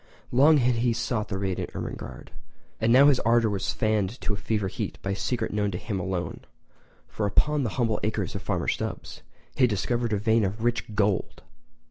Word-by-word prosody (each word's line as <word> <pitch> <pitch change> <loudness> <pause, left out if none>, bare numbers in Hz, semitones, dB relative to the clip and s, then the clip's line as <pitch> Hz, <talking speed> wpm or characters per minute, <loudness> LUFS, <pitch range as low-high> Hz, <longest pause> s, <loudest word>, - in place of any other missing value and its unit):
Long 145 +5 +6
had 125 -2 +2
he 120 0 +2
sought 115 -2 -2
the 95 - -3
radiant 95 -2 -3
Ermengarde, - - -7 0.5
and 110 +1 +2
now 130 +3 +7
his 145 -3 +5
ardour 115 -1 +3
was 100 -1 -1
fanned 110 +1 0
to 105 - -1
fever 105 -1 -1
heat - - -4
by 100 - -2
a - - -1
secret 120 +3 -2
known 105 -1 +1
to 90 - -4
him 100 0 -4
alone—for 95 +3 -6
upon 150 +8 +2
the 120 - 0
humble 115 -4 +1
acres 110 - -2
of - - -5
Farmer - - -2
Stubbs - - -3 0.3
he - - -3
had - - +1
discovered 120 +3 -1
a 105 - +2
vein 110 +2 +2
of 105 +3 -2
rich 120 -3 -1
GOLD!! 100 -2 0
110 Hz, 190 wpm, -26 LUFS, 100-120 Hz, 0.5 s, now